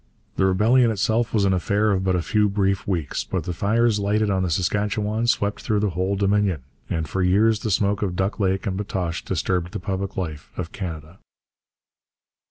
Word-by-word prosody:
The 95 - +3
rebellion 115 +6 +4
itself 110 +2 0
was 105 -3 +2
an 95 - +3
affair 100 +4 +1
of 95 -1 0
but 95 -1 +1
a 90 - 0
few 105 +1 +2
brief 100 -1 0
weeks, 85 -8 -1
but - - -3
the 90 - -4
fires 110 +4 +2
lighted 105 +1 +1
on 95 -1 +1
the 90 - 0
Saskatchewan 105 +5 0
swept 105 -3 0
through 105 -1 0
the 105 -2 +1
whole 95 +3 -1
Dominion, 100 -6 +1 0.3
and 80 -2 -2
for 95 - -2
years 105 +4 +3
the 110 - -3
smoke 100 +1 +1
of 95 -4 -1
Duck 95 +5 -1
Lake 95 -2 0
and 95 -3 -1
Batoche 95 -4 -3
disturbed 90 0 -1
the - - -3
public 95 +1 -4
life 80 -5 -4
of 90 -2 -4
Canada. 85 -6 -7
100 Hz, 190 wpm, -23 LUFS, 90-105 Hz, 0.3 s, rebellion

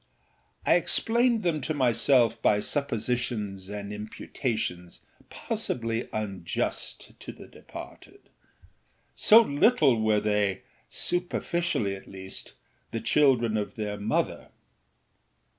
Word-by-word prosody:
I - - +5
explained 235 -1 +2
them 165 -4 0
to 155 +4 -2
myself 120 -2 +3
by 105 - +3
suppositions 115 -6 -2
and 105 0 -6
imputations 105 -4 -4 0.3
possibly 115 -1 -2
unjust 100 -5 -3
to - - -8
the - - -13
departed; - - -12 0.9
so 220 - +7
little 145 - +3
were 110 -1 +3
theyâsuperficially 105 - -1
at 95 - -13
leastâthe 95 +3 -8
children 120 -5 +3
of 105 +4 -4
their 105 -3 -4
mother. 105 +2 -1
115 Hz, 90 wpm, -27 LUFS, 105-140 Hz, 0.9 s, so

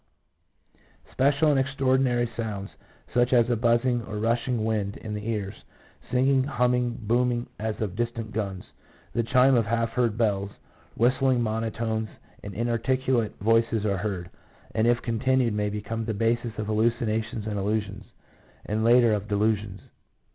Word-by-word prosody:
1 135 +2 +4
Special 150 +2 +2
and 140 - +3
extraordinary 130 -2 +1
sounds, 105 -4 -4 0.4
such 120 0 +3
as 120 -2 +5
a - - +3
buzzing 120 +2 +2
or 105 -1 -7
a - - -2
rushing 115 +1 0
wind 105 -3 -1
in 110 - -6
the 105 +1 -5
ears, 105 -3 -2 0.6
2 125 - 0
singing, 130 +1 +3
humming, 125 -2 0
booming 120 +2 +1
as 110 0 -3
of 100 -4 -3
distant 115 -1 -3
guns, 100 -4 -3 0.5
the 115 - +1
chime 125 +3 +4
of 115 -4 +3
half 115 +1 0
heard 120 -3 0
bells, 100 -4 +1 0.5
3 115 - +3
whistling 130 0 +2
monotones, 110 0 -2 0.3
and 100 -1 -8
inarticu 120 +2 +1
late 110 -2 -3
voices 115 0 +2
are 100 -2 +1
heard, 95 -3 -4 0.4
and 110 +1 +2
if 120 0 +3
continued 125 0 +1
may 105 0 0
become 105 +2 -4
the 110 -1 -3
bases 115 +1 0
of 110 - -2
hallucinations 110 0 0
and 105 -2 -2
illusions, 105 0 -2 0.6
and 110 +1 -1
later 120 -1 +5
of 105 0 -2
delusions. 105 -2 0
115 Hz, 160 wpm, -26 LUFS, 105-120 Hz, 0.6 s, as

